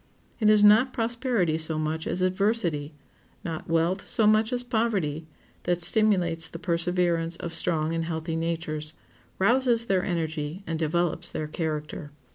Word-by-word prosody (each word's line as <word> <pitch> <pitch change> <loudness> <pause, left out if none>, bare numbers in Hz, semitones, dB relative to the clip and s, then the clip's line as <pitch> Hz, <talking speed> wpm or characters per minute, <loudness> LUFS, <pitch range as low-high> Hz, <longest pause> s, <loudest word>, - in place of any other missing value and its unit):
It 215 -2 +4
is 210 -1 +5
not 220 +5 +6
prosperity 230 -8 0
so 160 0 0
much 155 +1 -2
as 185 - 0
adversity, 185 -6 0 0.5
not 165 -2 -5
wealth 165 +4 0
so 220 - +2
much 215 +2 +4
as 245 0 -1
poverty, 205 - -1 0.4
that 175 -1 +1
stimulates 175 -6 +2
the 165 - -8
perseverance 170 -1 0
of 170 0 -6
strong 160 -1 +1
and 165 0 -1
healthy 160 0 -3
natures, 165 -2 -3 0.4
rouses 235 +3 +2
their 190 -4 +1
energy, 160 0 -3
and 165 -1 -3
develops 170 +1 -1
their 155 - -4
character. 150 -1 -4
170 Hz, 145 wpm, -26 LUFS, 160-210 Hz, 0.5 s, not